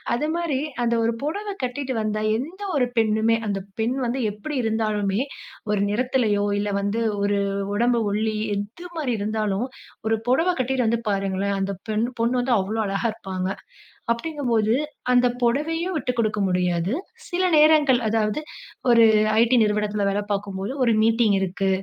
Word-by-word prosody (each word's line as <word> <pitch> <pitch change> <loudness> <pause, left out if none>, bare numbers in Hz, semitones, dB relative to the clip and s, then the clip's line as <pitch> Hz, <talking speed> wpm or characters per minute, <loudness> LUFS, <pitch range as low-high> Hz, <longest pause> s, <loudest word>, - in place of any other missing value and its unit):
அது 300 +5 -1
மாரி 335 -6 -1 0.2
அந்த 235 0 +1
ஒரு 230 - +1
பொடவ 400 +9 -3 0.2
கட்டிட்டு 260 +1 -2
வந்தா 215 0 -1
எந்த 335 - -6 0.2
ஒரு 250 -2 +2
பெண்ணுமே, 225 0 +3
அந்த 200 -1 -1 0.2
பெண் 245 +4 0
வந்து 250 +2 -1
எப்டி 215 +9 -7
இருந்தாலுமே, 215 -2 0 0.5
ஒரு 205 -1 +1
நிறத்துலயோ, 220 -2 +1
இல்ல 205 - -1
வந்து 205 +3 -1 0.2
ஒரு 200 0 +1 0.4
உடம்பு 235 +2 +2
ஒல்லி 215 +1 0 0.2
எது 215 - -6
மாரி 280 -6 -1
இருந்தாலும், 215 +1 -1 0.4
ஒரு 225 0 +2
பொடவ 325 +8 +3
கட்டிட்டு 255 -2 0
வந்து 235 +1 +1
பாருங்களேன், 195 0 -1
அந்த 195 +1 -1 0.2
பெண் 215 +2 +1
பொண்ணு 245 +2 +2
வந்து 245 -1 +2
அவ்வளொ 210 +4 -2
அழகா 195 +4 -1
இருப்பாங்க. 190 -3 -4 0.6
அப்டிங்கும்போது 235 -5 0 0.4
அந்த 250 0 +5 0.2
பொடவையும் 325 +9 0
விட்டுக்குடுக்க 230 -4 -1
முடியாது. 180 0 0 0.4
சில 365 0 0
நேரங்கள் 300 -4 +5
அதாவது 215 +2 +1 0.5
ஒரு 230 -1 +7 0.4
ஐட்டி 235 +2 +4
நிறுவனத்ல 210 0 0
வேல 200 - 0
பாக்கும்போது 200 +2 -3
ஒரு 235 - +3
மீட்டிங் 225 -2 +3
இருக்கு, 190 +1 -1
225 Hz, 145 wpm, -23 LUFS, 205-255 Hz, 0.6 s, ஒரு